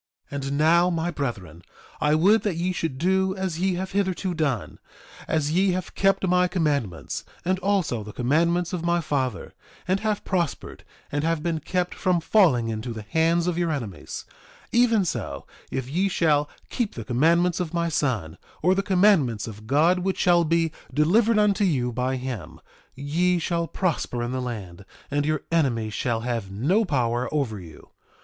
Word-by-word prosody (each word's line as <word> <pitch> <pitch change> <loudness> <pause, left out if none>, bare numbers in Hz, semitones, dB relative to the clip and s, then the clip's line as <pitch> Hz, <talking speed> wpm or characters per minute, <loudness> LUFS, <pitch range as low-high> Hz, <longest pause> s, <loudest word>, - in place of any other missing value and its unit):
2:31 140 -1 -4
And 140 +1 -2
now, 170 +4 +4
my 170 0 -1
brethren, 100 - -5 0.4
I 150 +1 +3
would 200 +8 +4
that 205 -5 -1
ye 175 +2 -1
should 165 -7 -3
do 190 +4 +1
as 190 -4 -3
ye 190 0 +1
have 190 +2 -4
hitherto 190 -1 -1
done. 145 -8 -2 0.5
As 155 -2 0
ye 185 +2 +3
have 185 0 -4
kept 195 0 +2
my 180 0 +3
commandments, 145 - -2 0.2
and 185 +1 +1
also 185 - 0
the 105 - -8
commandments 170 - +1
of 175 -2 -3
my 170 0 +2
father, 130 - -2 0.3
and 190 +1 +2
have 215 -1 -2
prospered, 175 -6 -2 0.3
and 145 +1 -1
have 165 -1 0
been 165 -2 -1
kept 180 +3 -2
from 180 -2 +1
falling 160 - +3
into 115 +2 -4
the 110 -1 -7
hands 165 +8 +1
of 175 -1 -1
your 170 -1 +1
enemies, 115 - -5 0.5
even 230 -4 +3
so - - -4 0.2
if 130 -2 -3
ye 180 +8 0
shall 150 -5 +2 0.2
keep 240 -5 -2
the 115 - -6
commandments 165 +9 +2
of 175 -3 -2
my 170 -1 0
son, 120 - -1 0.2
or 180 +3 +5
the 195 - +1
commandments 180 - +3
of 110 0 -10
God 160 +8 +3
which 190 +1 -1
shall 175 -1 +4
be 165 0 +1 0.2
delivered 210 +9 +3
unto 210 -1 +3
you 130 -10 +1
by 125 +2 -1
him, 125 -10 -6 0.4
ye 165 +6 +1
shall 170 0 -1
prosper 155 -10 -2
in 120 - -3
the 130 0 -2
land, 100 -7 -6 0.3
and 145 +1 0
your 155 -1 0
enemies 120 -10 +1
shall 115 -1 -1
have 115 -4 -3
no 160 - +1
power 125 -6 0
over 130 -9 -1
you. 80 -4 -13
160 Hz, 175 wpm, -25 LUFS, 125-180 Hz, 0.5 s, or